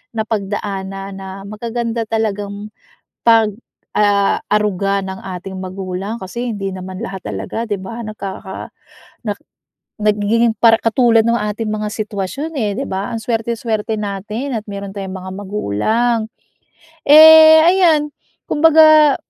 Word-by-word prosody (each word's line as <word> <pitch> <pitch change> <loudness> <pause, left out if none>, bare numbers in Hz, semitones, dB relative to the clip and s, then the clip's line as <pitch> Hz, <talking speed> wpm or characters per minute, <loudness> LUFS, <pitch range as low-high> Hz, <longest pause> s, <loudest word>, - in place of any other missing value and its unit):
napagdaan 205 -3 -3
na 195 0 -8
magaganda 230 +2 -4
talagang 210 -1 -3 0.5
pag, 225 -2 +5 0.5
ah, 205 -1 +3
aruga 200 -1 0
ng 190 0 -6
ating 190 0 -7
magulang. 190 +3 -5
Kasi 235 +5 -4
hindi 195 -2 -4
naman 185 +1 -7
lahat 195 -5 -6
talaga, 230 - -4
'di 205 -4 -3
ba, 230 +5 -7
nagkaka 195 -2 -7 0.5
nak 205 -3 -3 0.6
nagiging 215 +2 +1
para 225 -1 +4
katulad 230 0 +3
ng 235 0 +2
ating 210 0 -3
mga 215 0 -2
sitwasyon, 215 - -4
eh, 210 -5 -1
'di 275 - -3
ba? 195 +5 -3
Ang 230 - -2
swerte, 225 0 -2
swerte 220 -1 -2
natin 210 +6 -4
at 215 - -3
meron 200 0 -7
tayong 195 -2 -6
mga 185 0 -8
magulang. 210 - -1 0.8
Eh, 315 +1 +9
ayan, 330 -5 +3 0.3
kumbaga 310 -2 +6
210 Hz, 130 wpm, -17 LUFS, 195-235 Hz, 0.8 s, Eh